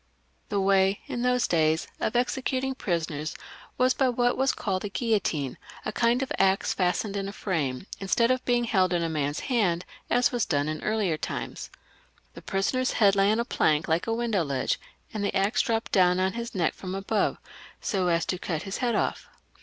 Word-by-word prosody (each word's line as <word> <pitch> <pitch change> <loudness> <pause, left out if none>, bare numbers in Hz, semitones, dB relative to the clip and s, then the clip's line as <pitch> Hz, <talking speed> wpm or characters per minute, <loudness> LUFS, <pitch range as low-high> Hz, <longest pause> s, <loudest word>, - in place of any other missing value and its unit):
The 200 - 0
way 195 0 +3
in 240 - -4
those 250 0 +2
days 160 -1 +2
of 220 - -1
executing 260 +2 0
prisoners 165 - -2 0.4
was 255 0 +4
by 265 -2 +2
what 245 0 +2
was 265 +1 +2
called 190 -3 -2
a 205 - -3
guillotine, 195 - -1 0.3
a - - -1
kind 240 +3 +2
of 265 - -6
axe 195 0 +3
fastened 195 +3 0
in 195 -1 -2
a - - -5
frame, 160 -9 -2
instead 230 +5 +2
of 255 0 0
being 240 -1 +2
held 190 -6 +2
in 170 -1 +1
a 165 - -1
man's 145 -2 -1
hand, 195 -9 +1 0.2
as 245 0 +3
was 240 -3 0
done 145 -4 0
in 155 0 -4
old 205 -8 0
times. - - -5 0.6
The - - -10
prisoner 195 +6 0
had 220 -6 +3
to 195 - +1
lay 195 +1 +4
his 215 - +3
head - - -1
on 235 - 0
a - - -2
ledge 155 +1 +3
like 165 +4 0
a 225 - +1
window 225 -6 0
ledge, 140 -4 -1 0.3
and 210 -2 -2
the 200 - -1
axe 195 +3 +2
dropped 225 0 -1
down 180 -1 +4
on 190 0 +1
his 235 0 -5
neck 170 -4 +1
from 185 0 -6
above, 200 +2 0 0.4
so 190 -3 0
as 170 -1 +2
to 185 - -2
cut 160 -5 -3
his 195 0 -4
head 240 -3 0
off. - - -1
195 Hz, 210 wpm, -27 LUFS, 175-235 Hz, 0.6 s, was